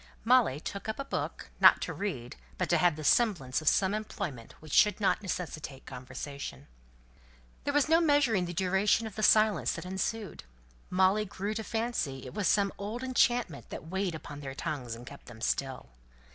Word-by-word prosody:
Molly 230 - +4
took 200 +6 -6
up 220 - -3
a 275 - -4
book, - - -4
not - - +8
to - - -4
read, 140 -13 -4 0.2
but - - 0
to - - +3
have 175 -3 +3
the 155 - -7
semblance 160 - +2
of 155 - -9
some 195 0 +2
employment 195 - -5
which 155 -2 -10
should 210 +1 +5
not 205 - +2
necessitate 155 -8 -5
conversation. 130 +2 -7 1.0
There 285 - 0
was 290 0 +4
no 325 +2 +5
measuring 285 - +3
the 175 - -5
duration 190 +5 +2
of 220 - -6
the 215 - -5
silence 210 - +4
that - - -6
ensued. 190 +1 -3 0.5
Molly 190 +3 +3
grew 200 +1 -4
to 220 +1 -4
fancy 220 - -2
it - - -8
was 205 -2 0
some 200 -1 +2
old 215 +5 -4
enchantment 240 - +1
that 160 - -8
weighed 190 -2 -1
upon 145 -2 -8
their 135 -2 -7
tongues 140 -7 -4
and 120 +1 -11
kept 140 +2 -12
them 115 -2 -11
still. 130 - -2
190 Hz, 185 wpm, -30 LUFS, 145-215 Hz, 1.0 s, not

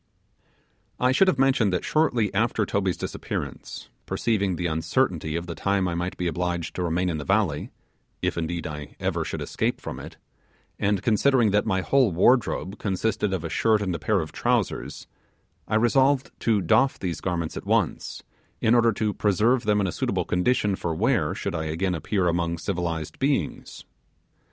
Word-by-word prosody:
I 125 +1 +3
should 190 +9 +4
have 170 - +3
mentioned 130 -6 +3
that 90 - -1
shortly 125 -10 +1
after 110 +1 +1
Toby's 95 -2 -1
disappearance, - - -5 0.2
perceiving 100 -5 0
the 90 - -3
uncertainty 80 - 0
of 85 +1 -2
the 85 - -5
time 100 +1 0
I 85 - -2
might 90 +2 -3
be 90 - -2
obliged 85 0 -2
to - - -4
remain 90 +2 0
in 80 -3 -1
the - - -4
valley 95 -5 0 0.5
if, - - -1
indeed, 85 0 -3
I 75 -2 -7
ever - - -1
should - - -4
escape - - -1
from - - -6
it - - -10 0.6
and 100 -2 +1
considering 120 0 +3
that 105 +2 +2
my 95 -3 +1
whole 130 +1 +3
wardrobe 100 +1 +2
consisted 105 +1 -1
of 95 -4 -2
a 80 - -3
shirt 110 +4 +2
and 95 -3 -2
a 85 - -3
pair 105 0 +1
of 80 - -6
trousers, - - -1 0.6
I - - 0
resolved 130 +4 +3
to 110 -3 +2
doff 110 +10 +3
these 85 -5 -4
garments 85 -3 -2
at - - -7
once, - - 0 0.4
in 115 - +3
order 120 -1 +5
to 105 0 -1
preserve 110 +6 +2
them 105 -1 +3
in 100 - +1
a 90 - -1
suitable - - -1
condition 100 +2 +1
for 85 -3 -3
wear - - +1
should - - -3
I 80 -1 -2
again 85 +4 -1
appear 90 +2 0
among 85 0 0
civilized 85 -3 -3
beings. 140 +1 -2
95 Hz, 180 wpm, -25 LUFS, 85-110 Hz, 0.6 s, order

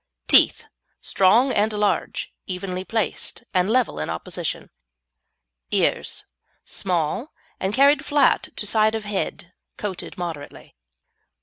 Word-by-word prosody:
TEETH - - +5 0.3
Strong 230 +8 +3
and 215 0 +1
large, 210 -1 -1
evenly 185 0 -4
placed, 225 +3 -3
and 185 +1 +2
level 245 - +1
in 75 - -3
opposition. 85 +1 -4 1.0
EARS - - 0 0.4
Small, 185 - -2 0.3
and 190 - -1
carried 280 +4 +4
flat 290 -2 +2
to - - -2
side 215 +1 +3
of 220 -1 -4
head, 190 -3 -4 0.2
coated 195 -4 -5
moderately. 165 - -7
205 Hz, 110 wpm, -23 LUFS, 180-225 Hz, 1.0 s, TEETH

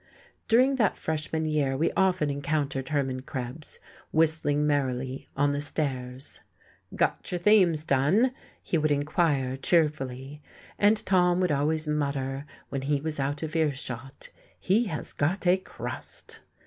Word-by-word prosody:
During 255 +4 +4
that 215 -6 +2
freshman 160 0 -2
year 145 -4 0
we 160 - +1
often 180 -6 +2
encountered 140 -2 -2
Hermann 135 -4 -1
Krebs, 130 +3 -7 0.3
whistling 155 -2 +2
merrily, 130 -2 -1
on 145 +1 +3
the 145 - -1
stairs. 135 -3 -4 0.5
"Got - - 0
your 180 - 0
themes 175 -5 +4
done?" 160 - +3 0.3
he 170 - 0
would 155 0 +1
inquire 145 -2 +1
cheerfully. 145 -3 0 0.4
And 210 +1 +3
Tom 180 -1 +3
would 180 -3 +2
always 155 +2 0
mutter, 140 -2 -2 0.2
when 135 - -3
he 140 +1 0
was 155 0 -3
out 145 +3 -2
of 160 +1 -5
earshot: 135 -4 -3 0.3
"He 215 +6 +2
has 160 -7 -5
got 175 +7 -1
a 180 +1 +5
crust!" 185 - -8
150 Hz, 135 wpm, -27 LUFS, 135-165 Hz, 0.5 s, a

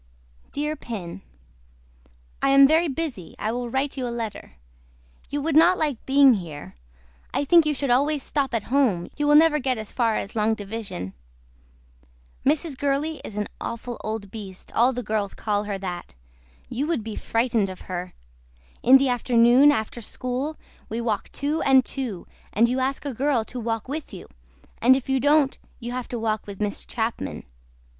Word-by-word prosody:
DEAR 300 +1 -2
PIN 190 - -7 1.2
I 275 - +3
AM 275 0 +8
VERY 320 +3 +3
BUSY 275 - -4
I 215 - -2
WILL 245 0 -3
WRITE 270 +3 -1
YOU 255 -2 -2
A - - -3
LETTER. 225 - -5 0.7
YOU 290 0 -2
WOULD 320 -1 0
NOT 345 +4 +6
LIKE 295 -7 -1
BEING 275 -1 +7
HERE 160 - -6 0.6
I - - +2
THINK 335 +1 +6
YOU 300 - +1
SHOULD 275 -2 -1
ALWAYS 285 +3 +2
STOP 275 -4 -1
AT 220 - -1
HOME 225 -12 +2
YOU 295 0 0
WILL 295 - +6
NEVER 310 0 +6
GET 255 -2 0
AS 215 -1 -5
FAR 230 -3 +1
AS 200 - -4
LONG 220 0 +2
DIVISION. 200 - -6 1.3
MRS. 295 0 +1
GURLEY 285 +3 -1
IS 210 - -8
AN 210 - -1
AWFUL 235 +1 -5
OLD 215 -2 -4
BEAST 195 -4 -9
ALL 245 +3 +4
THE 250 -1 -4
GIRLS 210 -2 -2
CALL 210 -1 -1
HER 205 -1 -3
THAT. 180 - -6 0.5
YOU 275 +5 -2
WOULD 320 -9 -1
BE 220 -1 -6
FRIGHTENED 230 -3 0
OF 185 - -9
HER. 180 0 -5 0.7
IN 260 +3 +8
THE 270 0 +1
AFTERNOON 245 +3 +5
AFTER 235 -2 -2
SCHOOL 255 +7 -3 0.3
WE 225 - -3
WALK 225 -3 -2
TWO 295 +3 -2
AND 265 -2 +5
TWO 240 -10 -4 0.3
AND 230 +4 +4
YOU 250 +2 0
ASK 270 +2 -1
A 280 - -2
GIRL 260 -2 +1
TO 250 - -7
WALK 225 -1 -3
WITH 295 +3 -5
YOU 180 - -10 0.5
AND 255 +3 +7
IF 270 0 -4
YOU 265 0 +2
DON'T 285 0 +3 0.2
YOU 240 -1 -5
HAVE 250 0 -4
TO 245 - -4
WALK 220 -2 -2
WITH 200 -1 -8
MISS 205 -1 -2
CHAPMAN. 225 - -3
245 Hz, 180 wpm, -24 LUFS, 215-280 Hz, 1.3 s, AM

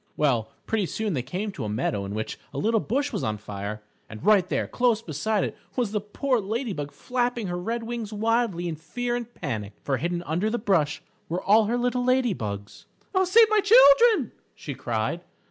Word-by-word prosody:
Well, 120 -7 +1 0.2
pretty 215 -4 0
soon 215 +1 -2
they 130 - 0
came 185 - -4
to 140 - -6
a 105 - -3
meadow 105 -2 -1
in 100 +1 -5
which 110 0 -4 0.2
a - - -3
little 225 +1 +2
bush 280 +7 -1
was 205 - -2
on 110 -1 -1
fire. 105 0 -6 0.3
And 110 - -9
right 205 -4 +5
there - - 0
close 245 -3 +2
beside 205 +3 -1
it, - - -3 0.2
was 240 -5 0
the 210 -1 -1
poor 250 +5 0
Lady 220 +3 -2
Bug 145 -3 -5
flapping 245 -2 -2
her 175 -1 -3
red 230 +5 -3
wings 230 -2 -4
wildly 220 -4 0
in 160 -2 -4
fear 240 +10 -3
and 240 -1 -5
panic 110 - -4
for 135 -2 0
hidden 175 +3 -2
under 175 +7 0
the 235 - -1
bush 170 -9 +1 0.3
were 175 +3 -2
all 215 +2 +5
her 235 +3 0
little 245 0 0
lady 255 -3 +2
bugs. 100 - -6 0.3
"Oh, 375 -1 +3
save 445 +5 +6
my 430 - +5
children!" 410 - +6 0.2
she 145 - -6
cried. 120 +7 -2
205 Hz, 205 wpm, -26 LUFS, 145-240 Hz, 0.3 s, save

